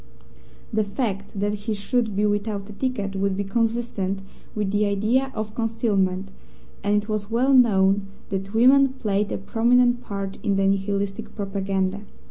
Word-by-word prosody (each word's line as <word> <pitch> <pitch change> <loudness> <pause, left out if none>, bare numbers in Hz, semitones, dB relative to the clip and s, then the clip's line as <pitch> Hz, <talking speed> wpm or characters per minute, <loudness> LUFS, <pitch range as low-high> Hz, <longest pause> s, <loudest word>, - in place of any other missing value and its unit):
The 215 0 +2
fact 200 -2 -3
that 205 +1 0
he 210 +1 -3
should 220 +1 -1
be 210 +1 +2
without 205 -1 -1
a 210 - -9
ticket 205 -4 -2
would 195 0 0
be 200 - 0
consistent 210 -2 -1 0.3
with 210 -2 -1
the 205 0 +2
idea 225 +7 +1
of 215 -1 -4
concealment, 200 -5 0 0.5
and 205 +1 +2
it - - -12
was 215 -2 -2
well 250 +4 +2
known 200 -5 +4 0.2
that 195 +2 -4
women 265 +3 +6
played 210 -5 -1
a - - -1
prominent 240 +4 +3
part 195 -2 -5
in 200 -3 +1
the 195 0 +2
Nihilistic 195 0 -1
propaganda. 195 -1 -1
205 Hz, 155 wpm, -24 LUFS, 195-225 Hz, 0.5 s, women